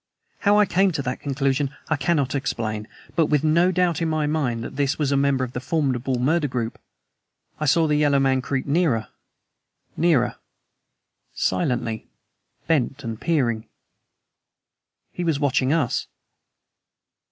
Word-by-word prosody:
How 205 0 +4
I 210 - +6
came 195 +1 +3
to 145 -2 -2
that 125 0 -3
conclusion, 140 0 -1
I 155 - +1
cannot 140 -1 0
explain; 110 -6 -2 0.3
but 165 -3 +3
with 150 -1 +2
no 170 +4 +4
doubt 180 -3 +1
in 165 - +1
my 155 -1 0
mind 140 -7 -1
that - - -7
this 140 +1 0
was 145 -3 0
a - - +3
member 140 -1 +2
of 125 -1 -5
the 125 - -3
formidable 130 -3 -1
murder 150 +5 +1
group, 120 -3 -3 0.8
I 155 - -1
saw 165 +4 +4
the 150 -1 +2
yellow 145 -2 +3
man 135 -1 +2
creep 130 +1 -2
nearer, 140 -7 +1 0.9
nearer, 155 -7 +2 1.0
silently, 110 +3 -1 0.6
bent 145 -3 0
and 115 -2 -5
peering. 120 -9 0 1.4
He 175 - -4
was 160 -4 0
watching 135 -2 +1
us. 155 -6 0
140 Hz, 145 wpm, -23 LUFS, 130-160 Hz, 1.4 s, I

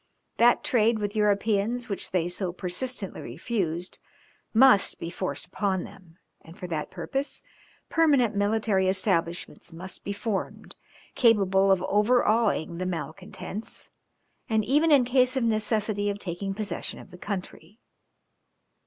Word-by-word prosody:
That 240 +1 +4
trade 230 -1 +2
with 205 0 -3
Europeans 210 +3 +1
which 200 -4 -4
they 175 -2 0
so 180 0 -3
persistently 190 +4 -3
refused, 180 -6 -3 0.5
must 235 -3 +5
be 165 - -6
forced 185 0 -4
upon 190 0 -1
them, 175 -3 -14 0.2
and 165 +2 -15
for - - -7
that 160 -4 -3
purpose 275 +1 -4 0.4
permanent 280 -9 +3
military 205 -2 +1
establishments 180 -3 -1
must 180 +3 -9
be 200 - -4
formed, 200 0 -4 0.4
capable 195 -5 +4
of 190 -1 +2
overawing 210 -5 +2
the 185 - -2
malcontents, 185 +4 -6 0.6
and 220 -2 +1
even 300 +7 +3
in 275 -4 +6
case 255 +1 +3
of 260 - +1
necessity 215 -2 0
of 200 - -2
taking 195 +1 -3
possession 205 -5 -4
of - - -13
the 180 - -11
country. 195 -1 -6
205 Hz, 130 wpm, -26 LUFS, 185-230 Hz, 0.6 s, in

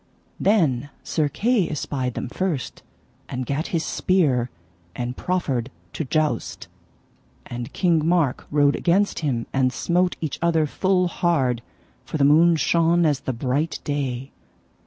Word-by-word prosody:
Then 145 - +2
Sir 155 -3 0
Kay 215 - +1
espied 135 -4 -3
them - - -3
first, 160 0 -3 0.5
and 125 0 -3
gat 140 +6 -2
his 160 -2 -1
spear, 140 -10 +1 0.5
and 125 0 -3
proffered 135 -10 -1 0.2
to - - -2
joust. 155 +2 -1 0.8
And 120 0 -6
King 170 -4 +2
Mark 165 -7 +1
rode 145 -1 +3
against 195 +4 +1
him, 130 -7 -1
and 130 -1 +2
smote 180 +5 +1
each 155 -3 -4
other 165 -2 +2
full 185 +4 +1
hard, 140 -9 +1 0.4
for 145 - -4
the 140 - +2
moon 165 +4 +6
shone 170 +1 +3
as 145 -3 +2
the 135 - -3
bright 135 +6 -1
day. 135 -3 -3
150 Hz, 135 wpm, -23 LUFS, 130-170 Hz, 0.8 s, moon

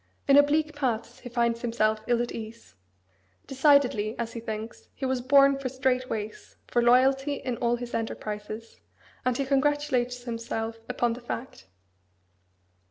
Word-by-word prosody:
In 275 - +6
oblique 300 +2 +4
paths 250 -6 -2
he 245 - -9
finds 235 -1 0
himself 220 -2 +1
ill 240 0 +2
at 240 - -5
ease. 225 0 -9 0.7
Decidedly, 265 -6 +3
as 230 -1 -4
he 235 - -5
thinks, 220 0 -7
he 265 - -4
was 260 -1 0
born 275 +1 +5
for 265 -2 -3
straight 255 0 0
ways, 215 -1 -6
for 240 - +1
loyalty 265 +4 +4
in 255 -3 -3
all 240 0 +1
his 240 0 -7
enterprises; 215 0 -5 0.5
and 250 -1 +1
he 275 - -1
congratulates 265 -3 +1
himself 230 -1 -4
upon 240 -2 +1
the 240 - -8
fact. 235 - -7
245 Hz, 150 wpm, -27 LUFS, 230-270 Hz, 0.7 s, In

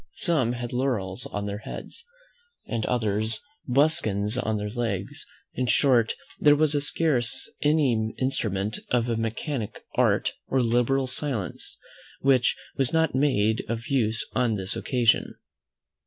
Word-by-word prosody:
Some 135 -9 +1
had 120 -1 -5
laurels 115 -8 -1
on 100 0 -4
their 100 0 -4
heads, 465 - -8 0.6
and 115 -2 -2
others 110 -2 0 0.3
buskins 125 -7 +2
on 110 -4 -1
their 105 0 -4
legs; 110 -5 -3 0.3
in 125 0 -1
short, 120 -3 +3 0.2
there 145 0 +6
was 155 0 +3
scarce 140 -6 +1
any 135 -8 +2
instrument 105 -6 -1
of 120 -1 +1
a 115 - 0
mechanic 115 +2 -3
art, - - +2
or 135 - +1
liberal 125 +3 +2
science, 125 - -3 0.4
which 130 -3 +3 0.2
was 135 -2 +2
not 160 -2 +2
made 110 -6 +2
of 115 0 -3
use 115 -5 +1
on 120 -4 +1
this 95 -1 -1
occasion. 120 -4 +1
120 Hz, 130 wpm, -26 LUFS, 110-135 Hz, 0.6 s, there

